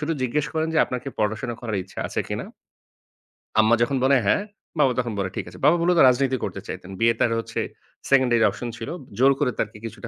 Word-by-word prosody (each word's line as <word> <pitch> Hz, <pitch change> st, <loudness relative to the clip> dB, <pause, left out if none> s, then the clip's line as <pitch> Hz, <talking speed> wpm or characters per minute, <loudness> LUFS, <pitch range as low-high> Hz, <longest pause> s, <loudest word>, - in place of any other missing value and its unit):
শুধু 155 Hz, +2 st, -1 dB
জিজ্ঞেস 140 Hz, +4 st, 0 dB
করেন 160 Hz, 0 st, 0 dB
যে, -, -, +3 dB
"আপনার 125 Hz, -, -4 dB
কি -, -, -4 dB
পড়াশোনা 110 Hz, +3 st, -1 dB
করার 110 Hz, -4 st, -3 dB
ইচ্ছা 95 Hz, -, -13 dB
আছে -, -, -2 dB
কিনা? -, -, -3 dB, 1.1 s
আম্মা 110 Hz, +2 st, +5 dB
যখন 135 Hz, +3 st, +2 dB
বলে, 135 Hz, +1 st, +5 dB
"হ্যাঁ।" 195 Hz, -, +2 dB, 0.4 s
বাবা 135 Hz, -3 st, +5 dB
তখন 120 Hz, -3 st, -1 dB
বলে, 95 Hz, -1 st, -1 dB
"ঠিক -, -, -3 dB
আছে।" -, -, -13 dB
বাবা 165 Hz, +4 st, +6 dB
মুলত 175 Hz, +1 st, +3 dB
রাজনীতি 130 Hz, +1 st, +2 dB
করতে 100 Hz, -, -4 dB
চাইতেন। 95 Hz, +1 st, -7 dB
বিয়ে 115 Hz, 0 st, +4 dB
তার 115 Hz, -, +2 dB
হচ্ছে 115 Hz, -, -4 dB, 0.5 s
সেকেন্ডারি 125 Hz, -4 st, +4 dB
অপশন 120 Hz, -, -6 dB
ছিল। 115 Hz, -, -6 dB, 0.3 s
জোর 135 Hz, +2 st, +5 dB
করে 140 Hz, -4 st, +2 dB
তাকে 105 Hz, 0 st, -2 dB
কিছুটা 115 Hz, +1 st, -7 dB
120 Hz, 210 wpm, -24 LUFS, 110-140 Hz, 1.1 s, বাবা